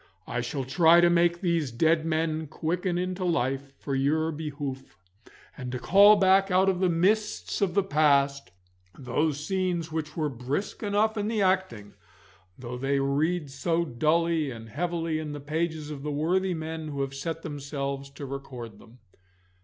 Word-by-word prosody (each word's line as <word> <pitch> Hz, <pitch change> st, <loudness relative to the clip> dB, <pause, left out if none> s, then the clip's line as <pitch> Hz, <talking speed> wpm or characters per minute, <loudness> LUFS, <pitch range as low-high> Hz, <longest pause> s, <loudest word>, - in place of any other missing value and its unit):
I 120 Hz, -, -2 dB
shall 135 Hz, +3 st, -3 dB
try 165 Hz, +6 st, +5 dB
to 175 Hz, 0 st, +5 dB
make 170 Hz, 0 st, +2 dB
these 170 Hz, -7 st, 0 dB
dead 160 Hz, +6 st, +2 dB
men 160 Hz, -1 st, -1 dB
quicken 175 Hz, +4 st, -2 dB
into 185 Hz, +1 st, -2 dB
life 135 Hz, -4 st, -1 dB
for 140 Hz, -, -5 dB
your 155 Hz, +4 st, +1 dB
behoof, 145 Hz, -, -6 dB, 0.6 s
and 125 Hz, -3 st, -6 dB
to 125 Hz, -, -3 dB
call 200 Hz, -, +7 dB
back 195 Hz, 0 st, +4 dB
out 190 Hz, +1 st, +4 dB
of 185 Hz, -2 st, 0 dB
the 185 Hz, -1 st, +2 dB
mists 205 Hz, +8 st, 0 dB
of 195 Hz, -3 st, +1 dB
the 200 Hz, -, +4 dB
past 140 Hz, -5 st, +2 dB, 0.5 s
those 145 Hz, +3 st, -1 dB
scenes 180 Hz, -3 st, -1 dB
which 155 Hz, -1 st, -4 dB
were 155 Hz, -2 st, +1 dB
brisk 135 Hz, -, -4 dB
enough 215 Hz, +1 st, +1 dB
in 205 Hz, 0 st, -1 dB
the 220 Hz, -2 st, 0 dB
acting, 185 Hz, -, 0 dB, 0.6 s
though 125 Hz, 0 st, -7 dB
they 135 Hz, +1 st, +1 dB
read 145 Hz, +3 st, 0 dB
so 165 Hz, +5 st, 0 dB
dully 160 Hz, +3 st, +1 dB
and 115 Hz, -2 st, -9 dB
so -, -, -17 dB
heavily 165 Hz, 0 st, -1 dB
in 150 Hz, -2 st, -5 dB
the 145 Hz, -, -6 dB
pages 155 Hz, +1 st, -3 dB
of 145 Hz, -2 st, -6 dB
the 150 Hz, -, -4 dB
worthy 180 Hz, +5 st, 0 dB
men 160 Hz, 0 st, -5 dB
who 140 Hz, -2 st, -4 dB
have 135 Hz, 0 st, -3 dB
set 165 Hz, +4 st, -5 dB
themselves 140 Hz, -2 st, -4 dB
to 140 Hz, +1 st, -8 dB
record 130 Hz, -4 st, -8 dB
them. 115 Hz, +2 st, -17 dB
155 Hz, 170 wpm, -27 LUFS, 140-175 Hz, 0.6 s, call